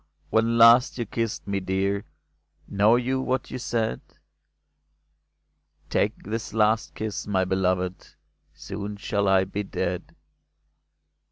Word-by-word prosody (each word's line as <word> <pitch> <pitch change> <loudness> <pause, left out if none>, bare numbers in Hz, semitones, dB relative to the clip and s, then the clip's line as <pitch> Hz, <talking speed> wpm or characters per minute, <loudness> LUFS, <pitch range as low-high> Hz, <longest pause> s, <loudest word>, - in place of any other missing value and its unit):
when 115 +1 +2
last 115 +3 +6
you 120 - -2
kissed 115 0 -3
me, 100 -1 -1
dear, 95 +1 -1 0.6
Know 105 +3 +4
you 130 +2 0
what 130 0 -2
you 130 - -4
said? 115 - -1 1.0
" - - -44
Take - - 0
this 110 +2 -5
last 110 +1 +2
kiss, 110 -2 -4
my 95 -2 +1
beloved, 90 -1 -1 0.4
Soon 100 +1 -7
shall 100 0 -1
I 95 -1 +4
be 100 +2 -4
dead 100 - -4
105 Hz, 120 wpm, -25 LUFS, 95-115 Hz, 1.0 s, last